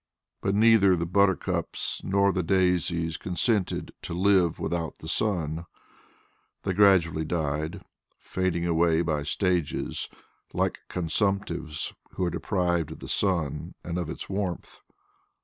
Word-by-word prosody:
But 100 0 0
neither 105 -3 +6
the 85 -1 -1
buttercups 95 +1 0
nor 100 +1 +3
the 95 - 0
daisies 85 -2 +1
consented 95 +2 0
to 85 - -5
live 95 -3 +3
without 85 -3 -2
the 80 - -10
sun; 85 -4 0 1.0
they 95 - 0
gradually 90 -5 +4
died, 80 -1 -2 0.3
fading 95 -2 -1
away 85 0 +3
by 80 -3 0
stages 90 +1 -1 0.4
like - - 0
consumptives 85 -3 -1 0.2
who - - -2
are 85 - 0
deprived 85 -2 0
of - - -12
the - - -9
sun 85 -8 0
and 85 +1 -3
of 85 -3 -3
its - - -5
warmth. 95 -3 -4
85 Hz, 125 wpm, -27 LUFS, 80-95 Hz, 1.0 s, neither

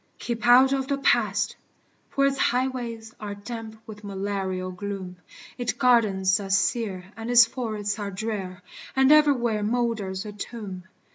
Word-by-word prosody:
Keep 235 0 -3
out 260 +2 +7
of 265 -1 -1
the 280 -1 0
Past! 275 - +1 0.5
for 275 - +1
its 275 -1 +1
highways 240 -3 -1
Are 205 -1 -5
damp 220 +1 -8
with 210 -1 -11
malarial 195 -2 -3
gloom; 185 -1 -6 0.4
Its 245 - -1
gardens 210 -7 +3
are 195 -1 -6
sere 195 -1 0
and 225 +1 -6
its 245 -1 +8
forests 215 -3 -3
are 205 -1 -3
drear. 195 -2 -5 0.3
And 265 +1 +5
everywhere 260 -8 +4
molders 215 -4 -1
a 210 - -6
tomb. 200 -3 -7
220 Hz, 145 wpm, -25 LUFS, 195-245 Hz, 0.5 s, its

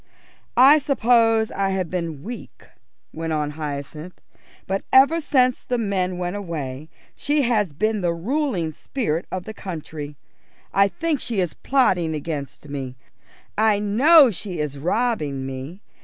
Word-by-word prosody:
"I 275 +5 +8
suppose 230 -5 +3
I 195 0 0
have 185 -3 -2
been 165 -5 -4
weak," 240 +5 -9 0.5
went 160 0 -3
on 150 -1 -1
Hyacinth, 150 +3 -6 0.5
"but 195 +1 -2
ever 280 +6 +6
since 255 -4 +2
the 250 - -1
men 190 -5 -1
went 180 +1 -3
away 155 -7 -5 0.2
she 290 0 0
has 215 - +1
been 215 +8 -1
the 175 -1 +1
ruling 190 - -1
spirit 170 - -3
of 185 -1 -3
the 220 - -8
country. 155 -7 -7 0.6
I 195 0 +5
think 295 - -2
she 230 -5 -3
is 180 -3 0
plotting 180 - +1
against 150 -1 -5
me; 135 -3 -5 0.6
I 215 -1 +3
know 255 +8 +6
she 185 -1 -6
is 150 -2 -3
robbing 160 - -1
me. 135 +8 -7
185 Hz, 140 wpm, -22 LUFS, 155-235 Hz, 0.6 s, I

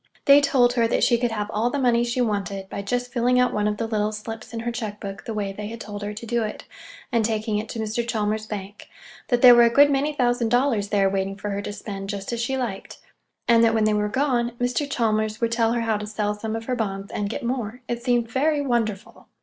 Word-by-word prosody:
They 280 +1 +8
told 255 -4 +3
her 235 -2 +2
that - - +1
she 235 -2 +4
could 240 0 +1
have 210 -1 -3
all 225 +3 +1
the 285 - -2
money 240 -3 +3
she 240 +1 -1
wanted 200 -4 -2
by 200 - -4
just 245 +5 -3
filling 250 0 +2
out 250 0 +2
one 210 0 +1
of 210 0 -1
the 230 - -2
little 215 -1 0
slips 220 +1 -7
in 230 -1 -4
her 240 +1 -2
check 215 -3 -5
book 195 0 -7
the 225 - -4
way 200 -2 -2
they 205 +1 -6
had 230 +1 -7
told 205 -1 -7
her 205 0 -3
to 215 +3 -8
do 235 +1 0
it 215 -1 -4 0.5
and 230 -2 +2
taking 215 -1 -1
it 215 +1 -6
to - - -6
Mr. 220 +2 -1
Chalmers's 215 -1 -1
bank—that 210 +4 -6
there 250 -1 +11
were 240 - +7
a 235 - +6
good 285 +4 +5
many 280 +2 +1
thousand 245 -4 +1
dollars 245 -4 +2
there 200 -2 +3
waiting 195 0 -1
for 205 +1 -5
her 200 0 -2
to 205 - -5
spend, 195 -1 -7
just 200 +2 -4
as 235 - -2
she 265 +3 -1
liked; 235 -7 -5 0.5
and 230 -1 +5
that, 225 0 +4
when 220 - +2
they 215 0 +3
were 210 0 0
gone, 245 -2 0
Mr. 250 +4 -1
Chalmers 215 -3 0
would 230 -1 0
tell 230 -1 +2
her 240 - 0
how 225 -2 0
to 210 0 -6
sell 210 -1 -1
some 220 +1 -4
of 225 0 -5
her 255 - -1
bonds 200 -4 -3
and 205 -1 -2
get 225 - -5
more. 240 -1 -3
It 240 0 -3
seemed 240 -2 +1
very 290 +5 +1
wonderful! 235 -7 -2
225 Hz, 255 wpm, -24 LUFS, 210-245 Hz, 0.5 s, there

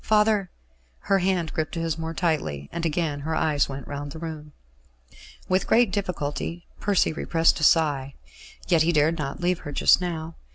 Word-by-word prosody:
Father 210 -3 +2 0.3
" - - -38
Her 195 - +5
hand 180 -3 0
gripped 160 +1 -2
his 165 -2 -1
more 165 0 -5
tightly, 110 - -1
and 170 0 -2
again 155 -2 -1
her 160 +3 -3
eyes 150 -4 +1
went 135 0 -7
round 145 0 -5
the - - -8
room. 155 -2 -7 1.0
With 185 +1 +1
great 235 -3 +4
difficulty 175 -3 -3
Percy 200 -5 +2
repressed 165 +1 +2
a - - -3
sigh. 145 -4 +3 0.5
Yet 170 -4 +4
he 170 +2 +3
dared 155 +2 +2
not 140 +1 -4
leave 180 0 +1
her 145 - -7
just 145 - +4
now. 165 -2 -4
160 Hz, 175 wpm, -25 LUFS, 145-175 Hz, 1.0 s, Her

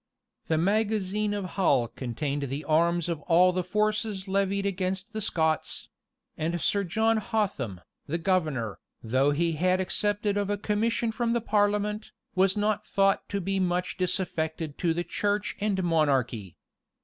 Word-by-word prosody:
[] - - -47
The 160 - +2
magazine 210 +2 +1
of 205 -2 -2
Hull 145 -10 +2
contained 140 +5 -3
the 140 +3 -4
arms 170 +2 +2
of 165 -3 -2
all 180 +2 +6
the 185 0 0
forces 210 +1 0
levied 195 +1 0
against 190 +2 -2
the 215 - -3
Scots; 160 -5 0 0.5
and 170 +2 -2
Sir 200 +5 +1
John 220 +5 +2
Hotham, 195 - -2 0.3
the 160 +3 -1
governor, 155 - 0 0.2
though 130 +5 +2
he 165 +4 +1
had 180 +4 +1
accepted 205 +2 0
of 205 -1 0
a 205 - 0
commission 220 +2 0
from 230 +1 0
the 235 - +2
parliament, 210 0 0 0.2
was 190 +2 +3
not 210 0 0
thought 195 0 +2
to 200 - -1
be 195 +1 -1
much 180 0 0
disaffected 160 -4 -2
to 170 -3 +1
the 175 - -1
church 205 +2 -1
and 200 -2 0
monarchy. 135 - +1
185 Hz, 155 wpm, -27 LUFS, 160-205 Hz, 0.5 s, all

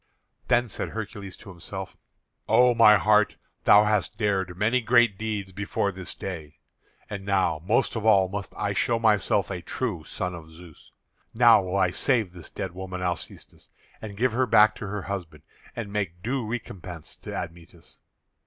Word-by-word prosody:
Then 120 0 +3
said 105 - -4
Hercules 105 -3 -7
to - - -13
himself: 85 -3 -7 0.5
"O 125 0 +5
my 110 -2 +7
heart, 105 0 +3 0.3
thou 105 - +7
hast 105 0 0
dared 95 -5 -1
many 115 +6 +2
great 120 -2 +4
deeds 105 -2 -4
before 100 +1 -1
this 95 -1 -7
day; 80 -6 -7 0.5
and 100 -1 -6
now 95 -5 +1
most 120 +5 +2
of 110 - -3
all 100 -4 +5
must 100 +1 -6
I 100 -1 -1
show 115 +3 +1
myself 105 -4 +2
a 90 -2 -4
true 100 -5 -3
son 90 +2 -4
of 80 -2 -9
Zeus. 80 -1 -16 0.4
Now 115 -2 +7
will 95 +1 -2
I 95 -2 +2
save 110 -3 0
this 85 -3 -11
dead 95 - -5
woman 95 0 -6
Alcestis, 90 -2 -6 0.3
and 105 -2 -8
give 125 +3 +2
her 125 +3 +1
back 110 -1 +6
to 105 - -6
her 100 0 -4
husband, 90 -5 -6 0.3
and 105 -4 -6
make 90 -4 -3
due 120 0 -2
recompense 95 -7 -7
to - - -8
Admetus. 85 0 -9
100 Hz, 170 wpm, -26 LUFS, 90-110 Hz, 0.5 s, my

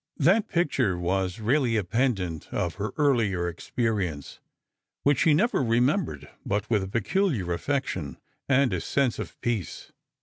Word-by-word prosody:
That 195 +9 +3
picture 135 - +1
was 90 +2 -1
really 120 +1 +2
a 105 - +1
pendant 95 - -1
of 85 -2 -1
her 105 - -2
earlier 115 - +2
experience, 90 - -3 0.6
which 145 -2 +3
she 155 -3 +4
never 230 - +2
remembered 120 - +1 0.2
but 105 +2 -1
with 105 -3 +3
a 95 - -4
peculiar 115 - 0
affection, 95 - -2 0.3
and 135 -4 +3
a 90 - -1
sense 130 +7 0
of - - -7
peace. 115 -7 -3
115 Hz, 140 wpm, -26 LUFS, 90-140 Hz, 0.6 s, she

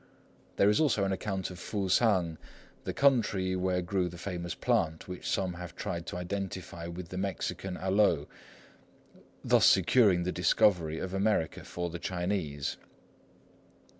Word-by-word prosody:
There 100 - +4
is 105 - +2
also 140 -10 +2
an 95 - 0
account 95 -1 -3
of 90 - -9
Fusang, 95 -4 +1 0.5
the - - -1
country 105 -9 +2
where 90 -1 0
grew 90 0 0
the 85 - -10
famous 85 -2 -4
plant 80 0 0
which 90 -1 -5
some 95 -2 0
have 90 0 -8
tried 85 -1 -4
to - - -4
identify 90 -2 -5
with 85 0 -7
the 90 - -4
Mexican 95 -1 -3
aloe, 95 -6 +2 1.2
thus - - +5
securing 100 -8 +5
the 90 - -1
discovery 90 -3 +2
of 95 +2 -4
America 95 -5 0
for 85 -1 -4
the 85 - -6
Chinese. 90 -6 -2
90 Hz, 140 wpm, -30 LUFS, 85-100 Hz, 1.2 s, thus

